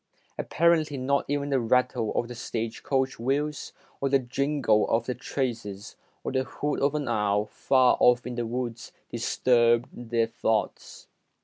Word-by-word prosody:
Apparently 160 -3 +1
not 140 +2 0
even 145 0 -1
the 135 - +3
rattle 125 -1 +1
of 120 - 0
the 120 - -7
stage 115 -1 -4
coach 135 -2 -1
wheels, 145 +5 -1 0.3
or 135 - 0
the 135 - +5
jingle 135 -3 +1
of 115 0 +1
the 125 - -2
traces, 115 -6 -4 0.3
or - - -3
the 130 0 +1
hoot 145 +2 -3
of 140 +2 +2
an 150 -1 -2
owl 105 0 +1
far 130 +3 +3
off 125 0 +4
in 125 - -4
the 120 -1 -3
woods, 120 0 -4 0.2
disturbed 120 0 +2
their 115 -1 -1
thoughts. 110 -1 -2
125 Hz, 155 wpm, -27 LUFS, 115-140 Hz, 0.3 s, the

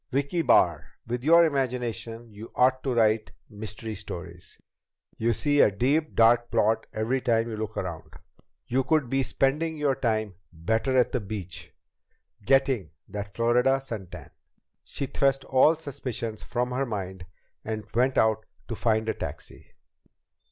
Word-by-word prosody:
"Vicki 140 +6 0
Barr, 85 - +3
with 120 +1 -3
your 170 +3 +7
imagination, 120 -5 -3
you 105 +3 -10
ought 130 +1 +3
to 130 -3 -1
write 110 -1 +2 0.2
mystery 110 +1 -6
stories! 90 -3 -8 0.6
You 115 +1 +2
see 145 +5 +2
a - - +6
deep, 140 +10 0
dark 120 +1 +4
plot 110 +2 +1
every 115 +5 -1
time 115 -2 +1
you 115 - -4
look 110 0 -5
around! 85 -4 -5 0.5
You 130 +2 +1
could 150 -3 +1
be 135 0 +2
spending 150 +5 0
your 145 -2 +2
time 110 -5 -1 0.2
better 110 +10 0
at 125 - +3
the 125 - 0
beach, 95 -4 -7 0.7
getting 130 - +2 0.2
that 100 -1 -6
Florida 125 +3 +3
sun 115 -8 -7
tan!" - - -11 0.5
She 140 - -4
thrust 135 0 0
all 135 +5 +5
suspicions 130 -7 -5
from 125 +1 -2
her 135 +2 -1
mind 95 -4 -5 0.4
and 110 -1 -4
went 130 +3 +2
out 110 -1 +2 0.2
to 115 - -3
find 110 0 +1
a 110 - +1
taxi. - - -8
120 Hz, 150 wpm, -27 LUFS, 110-135 Hz, 0.7 s, your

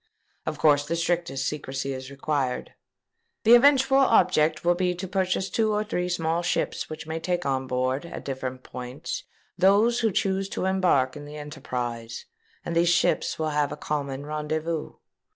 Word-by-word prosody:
Of 155 -1 -2
course 145 -2 +4
the 170 - 0
strictest 170 -5 -1
secresy 135 -2 -3
is 130 0 -7
required. 140 -2 -2 0.7
The 230 - +7
eventual 270 +1 +6
object 170 - +3
will 175 - +5
be 180 0 0
to 185 +2 -5
purchase 190 0 0
two 220 +1 +1
or 210 0 +1
three 180 -4 -2
small 165 -1 0
ships 175 - -1
which 155 0 -7
may 160 +1 -3
take 175 +1 -2
on 130 -1 -1
board, 130 +5 -1
at - - -8
different 130 -1 -4
points, 125 +4 -6 0.3
those 205 +6 +4
who 225 -2 +2
choose 195 +1 0
to 185 - -3
embark 180 -9 +2
in 145 -1 -8
the 150 +1 -9
enterprise; 125 -6 -5 0.4
and 170 - -3
these 170 0 +4
ships 170 - +2
will 155 -1 -1
have 150 -1 +1
a - - -5
common 140 -2 -3
rendezvous. 155 +1 -3
160 Hz, 170 wpm, -26 LUFS, 140-185 Hz, 0.7 s, The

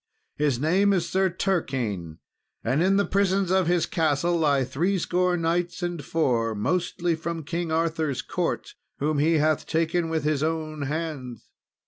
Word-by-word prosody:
His 145 -5 +1
name 190 +7 +3
is 175 -3 0
Sir 190 +1 +2
Turquine, 125 - -2 0.5
and 140 +5 +1
in 190 +2 +3
the 200 - +3
prisons 195 -1 +1
of 190 -2 +3
his 175 -1 +2
castle 160 +1 +1
lie 145 -5 +2
three 175 +10 0
score 180 0 +1
knights 170 +2 -1
and 175 -4 -3
four, 120 -8 0
mostly 175 - 0
from 165 0 -4
King 170 +2 -3
Arthur's 160 -3 0
court, - - -2 0.2
whom 150 +1 0
he 160 +3 +3
hath 155 0 +1
taken 165 +1 0
with 160 -2 -1
his 150 -2 +1
own 155 -1 -2
hands. 140 -5 -4
165 Hz, 155 wpm, -25 LUFS, 145-175 Hz, 0.5 s, name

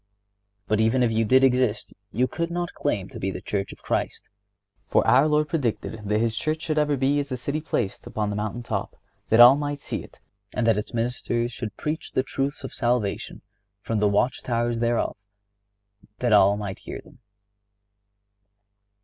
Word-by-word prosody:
But 110 +1 +2
even 120 +3 +3
if 120 - +2
you 110 0 +2
did 130 +5 +5
exist 125 -5 +2 0.2
you 125 +3 +2
could 170 +3 -3
not 175 0 -3
claim 100 -10 -1
to - - -9
be 95 - -1
the 95 - -5
Church 100 +1 -3
of - - -14
Christ; - - -2 0.6
for - - +2
our 135 +4 +5
Lord 150 0 +2
predicted 115 -8 -2
that 105 +1 +1
His 115 -1 0
Church 155 +6 -1
should 155 -2 0
ever 150 -1 +1
be 140 +2 +2
as 145 -1 -4
a 130 - -1
city 140 +5 -3
placed 120 -10 -3
upon 105 -1 -2
the - - -3
mountain 110 +3 -3
top, - - -3 0.3
that 115 - +4
all 120 +3 +10
might 145 0 -3
see - - -5
it, - - -16 0.4
and 125 - +1
that 115 -2 +4
its 105 - -6
ministers 120 0 -1
should 110 -3 -6
preach 155 +2 -4
the 130 - +2
truths 135 +2 -3
of 130 - -6
salvation 120 -4 -1 0.4
from 115 -2 -1
the 105 0 +3
watch 110 +5 +1
towers 120 -1 -1
thereof, 115 0 0 1.0
that 120 -3 +1
all 100 0 +6
might 100 -2 -5
hear - - -7
them. - - -17
120 Hz, 185 wpm, -25 LUFS, 110-140 Hz, 1.0 s, all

